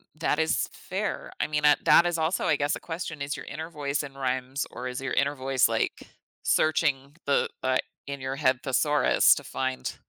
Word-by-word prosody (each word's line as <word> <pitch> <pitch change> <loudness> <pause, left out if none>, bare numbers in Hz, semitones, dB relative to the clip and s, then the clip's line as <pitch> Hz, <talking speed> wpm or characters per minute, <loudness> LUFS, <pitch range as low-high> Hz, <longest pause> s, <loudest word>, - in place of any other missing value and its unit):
That 155 -1 0
is 160 - +1
fair. - - -4
I - - +1
mean, 150 0 -1
uh, 145 - +7
that 170 - +7
is 175 -1 0
also, 160 +3 0
I 150 - +3
guess, 145 0 0
a - - -7
question, 165 -3 -6
is 140 0 -3
your - - -8
inner 160 +3 -6
voice 145 -2 -2
in 140 -2 -8
rhymes 130 +1 -2
or 125 - -6
is 125 0 -4
your 135 - -3
inner 140 +1 +1
voice, 130 -1 +2
like, - - -1 0.4
searching 145 -3 +1
the, 140 - +2
uh, 130 0 +2 0.3
in-your-head 130 -2 0
thesaurus 145 +3 +4
to - - -7
find 130 0 -3
140 Hz, 190 wpm, -27 LUFS, 130-155 Hz, 0.4 s, uh